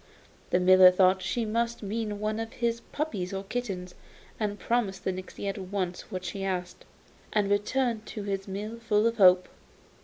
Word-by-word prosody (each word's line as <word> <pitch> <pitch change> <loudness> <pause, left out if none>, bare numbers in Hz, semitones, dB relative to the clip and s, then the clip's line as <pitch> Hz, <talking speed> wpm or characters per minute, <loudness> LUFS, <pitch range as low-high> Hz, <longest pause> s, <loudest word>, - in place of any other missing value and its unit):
The 180 - +3
miller 185 0 +8
thought 185 +1 +4
she 225 +5 -1
must 230 +1 -1
mean 210 0 -3
one 215 +1 -1
of 225 0 -5
his 235 -1 -1
puppies 210 - -3
or 195 0 -3
kittens, 195 -5 -4 0.5
so 210 -2 -1
promised 205 -3 -1
the 190 - 0
nixy 185 +2 -7
at 195 0 -3
once 185 -2 -4
what 185 -3 -5
she 195 +2 -4
asked, 180 -2 -3 0.5
and 205 -2 +2
returned 220 +2 0
to 210 - -6
his 195 -1 -3
mill 210 +4 -5
full 220 -2 +2
of 230 0 +1
hope. 185 -2 +6
205 Hz, 175 wpm, -28 LUFS, 185-225 Hz, 0.5 s, miller